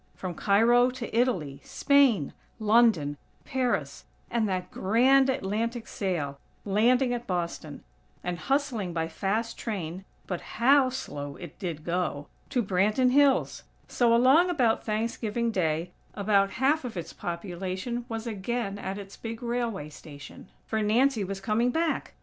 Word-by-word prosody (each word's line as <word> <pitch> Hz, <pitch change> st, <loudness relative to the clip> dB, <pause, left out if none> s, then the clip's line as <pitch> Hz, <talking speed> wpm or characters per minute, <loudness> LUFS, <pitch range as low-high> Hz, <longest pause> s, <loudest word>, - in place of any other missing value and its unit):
From 185 Hz, -2 st, -5 dB
Cairo 230 Hz, +7 st, +4 dB
to 250 Hz, -3 st, -6 dB
Italy, 185 Hz, -, 0 dB
Spain, 270 Hz, -, +3 dB, 0.3 s
London, 215 Hz, -10 st, +3 dB, 0.3 s
Paris, 260 Hz, -2 st, -2 dB, 0.3 s
and 225 Hz, -3 st, +1 dB
that 185 Hz, -1 st, -3 dB
grand 260 Hz, +7 st, +4 dB
Atlantic 230 Hz, 0 st, -2 dB
sail, 150 Hz, -8 st, -3 dB, 0.3 s
landing 245 Hz, +5 st, +3 dB
at 240 Hz, 0 st, -5 dB
Boston, 170 Hz, -4 st, -4 dB, 0.4 s
and 175 Hz, -1 st, -3 dB
hustling 235 Hz, -, -1 dB
by 165 Hz, -1 st, -1 dB
fast 205 Hz, +7 st, -2 dB
train 185 Hz, -5 st, -4 dB, 0.2 s
(but 180 Hz, -3 st, -4 dB, 0.2 s
how 265 Hz, +3 st, +5 dB
slow 145 Hz, -, -6 dB
it 175 Hz, -1 st, -11 dB
did 170 Hz, -6 st, -4 dB
go!!) 170 Hz, -4 st, -2 dB, 0.2 s
to 250 Hz, -4 st, +1 dB
Branton 210 Hz, +6 st, +2 dB
Hills! 280 Hz, 0 st, +3 dB, 0.3 s
So, 235 Hz, -2 st, +3 dB
along 270 Hz, +9 st, +5 dB
about 250 Hz, -10 st, +2 dB
Thanksgiving 230 Hz, +1 st, -1 dB
Day, 170 Hz, -3 st, -1 dB, 0.2 s
about 200 Hz, -1 st, +2 dB
half 280 Hz, +5 st, +2 dB
of 235 Hz, -6 st, -6 dB
its 170 Hz, -, -6 dB
population 185 Hz, +6 st, -4 dB
was 225 Hz, 0 st, -4 dB
again 215 Hz, -1 st, -3 dB
at 190 Hz, 0 st, -4 dB
its 200 Hz, -1 st, -9 dB
big 225 Hz, +1 st, -7 dB
railway 235 Hz, -9 st, -2 dB
station, 145 Hz, +2 st, -12 dB, 0.2 s
for 220 Hz, -1 st, -1 dB
Nancy 230 Hz, +2 st, +2 dB
was 195 Hz, 0 st, -4 dB
coming 215 Hz, +5 st, +1 dB
back. 325 Hz, +5 st, -1 dB
215 Hz, 140 wpm, -27 LUFS, 180-245 Hz, 0.4 s, how